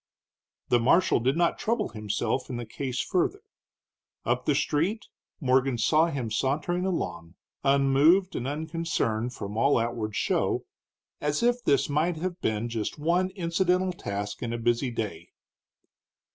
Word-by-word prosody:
The 120 - +4
marshal 135 +9 +4
did 130 +6 +1
not 170 -1 +2
trouble 225 -1 0
himself 105 +4 -2
in 125 - -3
the 120 - -5
case 130 +3 -4
further. 340 - 0 0.8
Up - - 0
the - - +3
street 185 +9 0 0.3
Morgan 130 -2 +2
saw 155 +8 +3
him 130 -8 -3
sauntering 155 - 0
along, 90 - -3 0.3
unmoved 140 +7 +4
and 125 - -2
unconcerned, 150 -7 -1
from 100 +2 -6
all 140 +5 +4
outward 115 -2 -2
show, - - 0 0.5
as 150 +7 -1
if 240 0 +2
this 140 -1 +3
might 155 +4 +1
have 180 +2 -4
been 110 +1 -1
just 115 -2 -3
one 175 +5 +1
incidental 180 +1 +1
task 100 - -5
in 120 - -3
a 120 - -2
busy 120 +2 +1
day. 105 -8 -5
140 Hz, 145 wpm, -27 LUFS, 115-170 Hz, 0.8 s, The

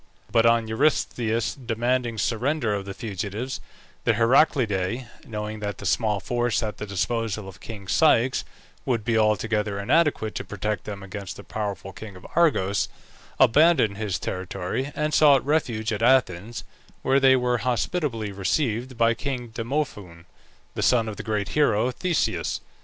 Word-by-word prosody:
But 115 0 +4
on 115 -1 +3
Eurystheus 115 -2 +1
demanding 120 -1 -1
the - - -6
surrender 120 +2 0
of 100 -1 -3
the 100 - -6
fugitives, 110 +3 -4 0.4
the - - +3
Heraclidae, 115 -4 +2 0.2
knowing 105 -1 -5
that 105 -1 -4
the - - -9
small 105 +1 +1
force 120 +3 0
at 105 -1 -4
the 105 - -6
disposal 105 +1 -2
of 95 -1 -11
king 105 -4 -9
Ceyx 130 +4 +3 0.4
would 115 -5 -1
be 115 - +1
altogether 105 -1 +1
inadequate 125 0 +1
to - - -4
protect 105 -1 -3
them 100 -2 -6
against 100 0 -7
the 100 - -10
powerful 100 -3 -5
king 100 +1 -9
of 90 - -13
Argos, 115 - +2 0.5
abandoned 145 -7 +5
his 105 -4 -2
territory, 95 +8 -4
and 150 0 -1
sought 145 -4 +5
refuge 115 -7 0
at 105 - -3
Athens, 115 -4 +2 0.4
where 135 +1 +3
they 135 -1 +6
were 125 -1 +1
hospitably 120 - -1
received 115 - -1
by 115 0 +4
king 125 -1 -4
Demophoon, 110 - -4 0.5
the - - -3
son 115 -3 +3
of 105 - -7
the - - -4
great 105 -2 -2
hero 125 -5 +2
Theseus. 170 +5 -1
115 Hz, 150 wpm, -25 LUFS, 105-130 Hz, 0.5 s, they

